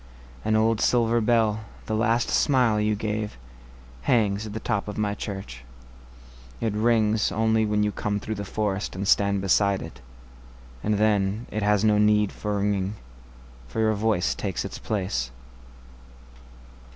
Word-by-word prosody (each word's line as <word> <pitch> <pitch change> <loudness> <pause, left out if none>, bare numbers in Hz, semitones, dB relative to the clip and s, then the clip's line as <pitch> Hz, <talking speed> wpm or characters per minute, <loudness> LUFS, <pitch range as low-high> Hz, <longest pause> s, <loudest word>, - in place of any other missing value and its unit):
An 110 - +1
old 110 0 +2
silver 115 -1 +3
bell, 110 -1 +2 0.2
the 110 - -3
last 115 +2 +1
smile 125 -7 +3
you 105 0 +1
gave, 105 - -3 0.7
Hangs 105 -2 +2
at 105 - -7
the 110 - -4
top 100 -1 -2
of 105 - -6
my 105 -1 0
church.It - - -8
rings 110 -1 +2
only 110 0 +2
when 105 0 +1
you 105 - +1
come 105 0 -2
through 110 - -4
the 100 -1 -5
forestAnd 100 -1 -2
stand 100 0 +3
beside 100 0 +2
it. 65 -6 -11 0.8
And 105 - +1
then, 105 +1 +1
it 110 - -2
has 105 0 +2
no 105 -1 +4
need 105 -1 +3
for 105 -1 -3
ringing, 100 0 -1 0.7
For - - -5
your 110 0 +3
voice 105 -3 +1
takes 95 -4 -3
its - - -6
place. 90 - -2
105 Hz, 145 wpm, -25 LUFS, 100-110 Hz, 0.8 s, no